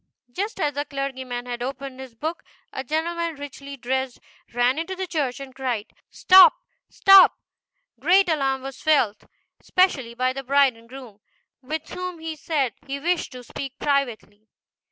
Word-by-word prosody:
Just 405 - -4
as 295 -5 0
the 285 - -2
clergyman 260 -4 -5
had 240 -1 -5
opened 265 +1 -5
his 260 -3 -10
book, 315 +8 -4 0.3
a 265 - -4
gentleman, 330 +3 -2
richly 280 0 -9
dressed, 260 0 -2 0.3
ran 245 +4 +1
into 375 +3 -4
the 375 0 -3
church 290 -8 -2
and 270 -1 -9
cried, 245 -5 -3
" - - -65
Stop! 370 -3 +9 0.3
stop 390 -1 +7
I" - - -46
Great 370 +6 +4
alarm 270 -5 0
was 270 -1 -8
felt, 245 -10 +2 0.3
especially 270 -11 +1
by 255 +1 0
the 270 - -5
bride 275 -1 +3
and 230 0 -19
groom, 250 -6 -11 0.4
with 310 +4 -5
whom 365 -1 -5
he 320 0 -6
said 285 -6 -1
he 275 +1 -4
wished 345 +3 -1
to 250 -1 -9
speak 270 +3 -7
privately. 235 -7 -2
275 Hz, 165 wpm, -24 LUFS, 255-320 Hz, 0.4 s, Stop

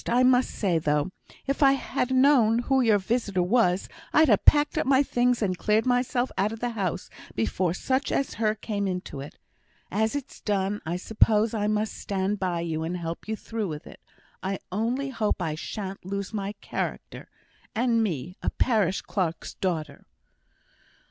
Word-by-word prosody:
I 245 +2 +3
must 255 0 +4
say, 180 -6 0
though, 150 +3 0 0.3
if 275 +1 -2
I'd 275 -1 +6
ha' 260 -1 -2
known 260 -4 +5
who 265 +2 +2
your 225 -4 +4
visitor 200 -2 0
was, 190 -2 +2 0.2
I'd 310 -1 +5
ha' 210 - +4
packed 295 0 +5
up - - -1
my 270 0 +5
things 245 -3 +1
and 185 -3 0
cleared 215 +5 +1
myself 250 0 +1
out 205 +3 +2
of 225 - -6
the 245 0 -1
house 190 -5 -2 0.3
before 165 - 0
such 260 +6 0
as 275 - 0
her 215 -1 +2
came 205 -2 -3
into 180 -6 -4
it. 140 +2 -9 0.5
As 220 +5 +1
it's 285 -1 -6
done, 200 0 -1
I 170 - -1
suppose 215 +3 +2
I 210 -2 0
must 215 0 0
stand 195 +1 -2
by 180 -3 -1
you, 160 -2 -2
and 170 +3 -2
help 170 +1 -5
you 220 - -1
through 220 -1 -4
with 150 -3 -6
it; - - -12 0.4
I 195 +1 -2
only 240 +8 -1
hope 220 -5 0
I 165 -4 -1
shan't 195 +4 -6
lose 200 +2 -4
my 200 -1 -3
character, - - -5 0.5
and 230 0 +2
me 180 - -3
a - - 0
parish 210 -7 +1
clerk's 175 -5 -2
daughter." 155 -6 -3
210 Hz, 175 wpm, -26 LUFS, 185-245 Hz, 0.5 s, I'd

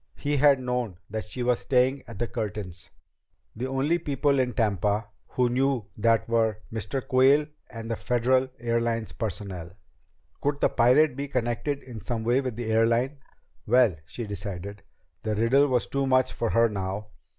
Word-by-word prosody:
He 145 0 -1
had 140 -1 +5
known 125 -7 -2
that 110 0 -3
she 125 - -5
was 125 0 +2
staying 130 +1 +2
at 115 - -9
the 120 - 0
Curtins'. 100 -7 -5 0.7
The 125 +4 -3
only 135 +6 +1
people 145 -2 +1
in 125 -1 +1
Tampa 105 -2 0 0.2
who 125 -1 +1
knew 130 -2 +1
that 115 +1 +2
were 115 -2 +1 0.2
Mr. 110 +4 -3
Quayle 135 +3 +5 0.2
and 115 -1 -7
the - - 0
Federal 130 +3 +1
Airlines 115 -1 -1
personnel. 95 -5 -5 0.7
Could 145 0 0
the - - +3
pirate 130 +4 +4
be 140 +1 -4
connected 130 +2 -2
in 120 -4 -9
some 115 0 -3
way 120 +4 +2
with 130 -4 -4
the 115 -1 -3
airline? 115 +5 +2 0.5
Well, 120 -4 +4
she 120 - -5
decided, 100 -1 -6 0.4
the 110 -1 -2
riddle 125 +7 +4
was 125 -3 +1
too 140 0 -1
much 130 -1 +3
for 115 - -1
her 115 0 +4
now. 100 0 -4
120 Hz, 165 wpm, -26 LUFS, 110-130 Hz, 0.7 s, had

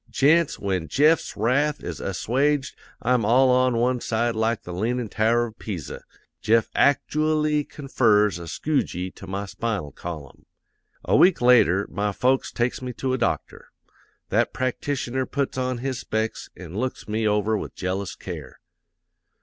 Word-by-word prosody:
Gents, 155 +3 +3
when 95 -5 -2
Jeff's 150 - +2
wrath 140 +7 +1
is - - -5
assuaged 135 +8 0 0.3
I'm 125 0 +2
all 125 +5 +4
on 125 -1 +3
one 125 +1 +1
side 115 +1 0
like 110 0 0
the 90 - -7
leanin' 115 +5 -1
tower 115 +3 +2
of 110 -2 -11
Pisa. 95 -8 -6 0.4
Jeff 115 0 +2
actooally 150 +1 +2
confers 105 - +2
a 85 - -8
skew 145 - 0
gee 90 +1 -5
to 95 - -12
my 100 +2 -3
spinal 105 -7 -3
column. 75 -3 -9 0.6
"'A - - +2
week 180 0 +5
later 115 -6 +5
my 105 0 -1
folks 130 +6 +1
takes 120 +2 -1
me 125 -1 -5
to 130 +2 -2
a 130 - -1
doctor. 120 - -2 0.6
That - - +1
practitioner 130 0 -2
puts 140 -1 -2
on 130 -1 -1
his 130 +1 -3
specs 110 -2 -3
an' 90 0 -9
looks 130 +1 -3
me 110 +1 0
over 105 +1 +1
with - - -5
jealous 95 +1 -3
care. 75 -8 -8
120 Hz, 155 wpm, -24 LUFS, 100-130 Hz, 0.6 s, week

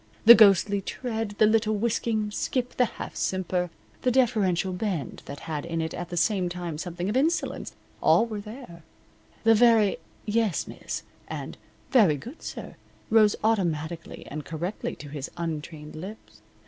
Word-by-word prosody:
The 235 - +13
ghostly 200 -2 +5
tread, 225 -1 -4
the 215 - +6
little 215 0 +3
whisking 220 -1 0
skip, 250 +3 -2
the 250 - +5
half - - -7
simper, 180 -1 -1 0.3
the 255 - +2
deferential 205 -8 +2
bend 180 - -3
that 140 - -7
had 155 -3 -4
in 165 -1 -3
it 160 0 -2
at 175 - -5
the 175 - -4
same 185 -1 +2
time 175 -3 -5
something 175 +1 -4
of 210 - -1
insolence, 320 +6 0 0.3
all 230 - +5
were 215 -3 -5
there; 210 -5 -10 0.6
the 225 0 +6
very 225 -3 +5 0.3
"Yes, 215 -3 +1
miss," - - -6 0.2
and - - -6 0.4
"Very 200 - +5
good, 245 - -10
sir," - - -7 0.3
rose 215 -2 +5
automatically 170 -6 -1
and 150 +1 -5
correctly 170 +6 -4
to 145 - -10
his 145 -1 -5
untrained 155 -2 -5
lips. 190 +7 -10
200 Hz, 155 wpm, -26 LUFS, 170-225 Hz, 0.6 s, The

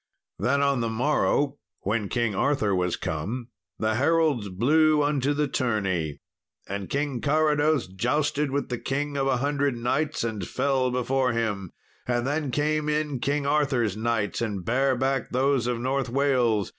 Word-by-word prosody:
Then 140 +3 +2
on 140 -2 +2
the 115 - 0
morrow, 145 +3 +1 0.2
when 105 0 -1
King 115 -3 0
Arthur 110 -1 +1
was 90 -2 0
come, 110 +11 -4 0.3
the 110 0 0
heralds 145 -4 +2
blew 150 +10 +3
unto 145 -1 +1
the 150 0 +1
tourney. 95 - -1 0.5
And 100 -1 -5
King 140 -3 -1
Carados 150 -1 +2
jousted 140 +9 0
with 140 +1 -2
the 125 -2 -3
King 145 +1 -2
of 135 -1 0
a 130 -2 +2
Hundred 140 -1 0
Knights 140 +6 -1
and 110 -6 -3
fell 135 -2 +1
before 125 0 0
him, 105 -5 -2 0.4
and 120 -1 0
then 145 +1 -1
came 150 +2 0
in 150 -3 -1
King 140 +3 0
Arthur's 135 -8 +1
knights 110 -2 -1
and 100 -6 -3
bare 130 +3 +2
back 135 0 -1
those 130 -1 +1
of 120 -1 -1
North 130 +1 -1
Wales. 125 -6 +2
130 Hz, 155 wpm, -26 LUFS, 115-145 Hz, 0.5 s, blew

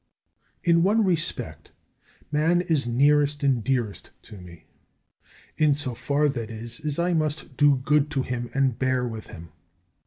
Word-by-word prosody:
20. 170 - +2
In - - +2
one 210 +3 +3
respect 170 -4 -2 0.6
man 160 +4 +2
is 155 -8 0
nearest 145 +4 +2
and 130 -5 +2
dearest 120 -4 -2
to 105 -3 -12
me; 85 -2 -14 0.9
in 150 -2 +3
so 140 -4 -2
far, 145 +5 0
that 120 -6 -3
is, 115 +1 -6
as 150 -2 -3
I 175 +1 +1
must 155 -4 -2
do 145 0 +4
good 145 +3 +1
to 135 -3 -1
him 120 -1 -4
and 135 -4 +1
bear 130 -1 0
with 110 -2 -7
him. 85 -1 -11
140 Hz, 160 wpm, -25 LUFS, 120-150 Hz, 0.9 s, do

